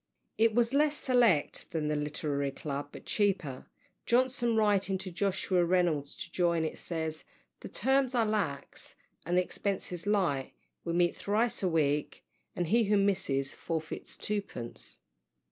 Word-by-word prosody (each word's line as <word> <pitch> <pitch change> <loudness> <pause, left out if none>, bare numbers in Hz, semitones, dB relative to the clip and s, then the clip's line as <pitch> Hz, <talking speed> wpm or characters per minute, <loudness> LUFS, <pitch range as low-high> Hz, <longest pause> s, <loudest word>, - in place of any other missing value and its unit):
It 225 -1 +4
was 240 +1 +2
less 295 +1 +3
select 235 - +2
than 155 -2 -2
the 150 - 0
Literary 145 -1 -1
Club, 140 +1 -5
but - - -11
cheaper. 190 -11 0 0.4
Johnson, 245 -1 +2
writing 200 -3 +2
to 190 0 -6
Sir - - -15
Joshua 185 -1 +1
Reynolds 170 -5 +1
to 180 -2 -8
join 170 -2 +1
it, 155 - -4
says, 160 -2 -4 0.4
"the - - -8
terms 265 -1 +1
are 230 -2 +3
lax 200 -10 -3 0.3
and 175 +1 +2
the 180 - +5
expences 185 -1 -3
light 175 -11 +1 0.3
we 170 - -2
meet 175 0 +2
thrice 225 +4 0
a 185 - +1
week, 150 -3 0 0.3
and 175 - 0
he 225 +7 +3
who 205 +1 +3
misses 140 -9 +1
forfeits 160 -1 -5
twopence." 200 - -4
180 Hz, 150 wpm, -31 LUFS, 155-215 Hz, 0.4 s, the